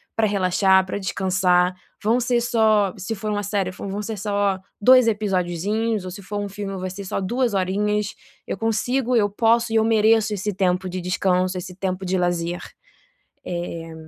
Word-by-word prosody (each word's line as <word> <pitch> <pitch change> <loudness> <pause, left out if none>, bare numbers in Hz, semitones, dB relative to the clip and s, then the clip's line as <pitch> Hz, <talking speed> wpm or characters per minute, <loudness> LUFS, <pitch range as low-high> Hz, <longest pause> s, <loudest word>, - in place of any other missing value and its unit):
pra 220 -1 +2
relaxar, 190 -1 +3
pra 185 - -4
descansar. 185 -1 +1 0.3
Vão 225 +4 +3
ser 240 0 +2
só 220 -4 +2
se 195 +4 -4
for 215 +1 -4
uma 205 0 -1
série, 195 -2 -1
vão 195 +1 -7
vão 200 +2 -3
ser 220 0 -4
só 200 -1 0 0.2
2 255 +1 +7
episodozinhos 205 +1 -1
ou 185 - -5
se 200 - -9
for 205 +2 -4
um 205 - -3
filme 195 -1 -5
vai 185 0 -4
ser 200 +2 -7
só 190 - -2
2 240 +4 0
horinhas, 205 +2 0 0.3
eu - - -3
consigo, 245 +4 0
eu 205 -3 +3
posso 230 +2 +2
e - - +4
eu 220 - +4
mereço 220 -1 +3
esse 205 +1 -2
tempo 185 0 0
de 185 0 -4
descanso, 185 0 0
esse 180 0 -7
tempo 190 0 -3
de 185 +1 0
lazer". 175 -1 -1 0.8
Eh, 170 -2 -5
200 Hz, 185 wpm, -22 LUFS, 185-215 Hz, 0.8 s, 2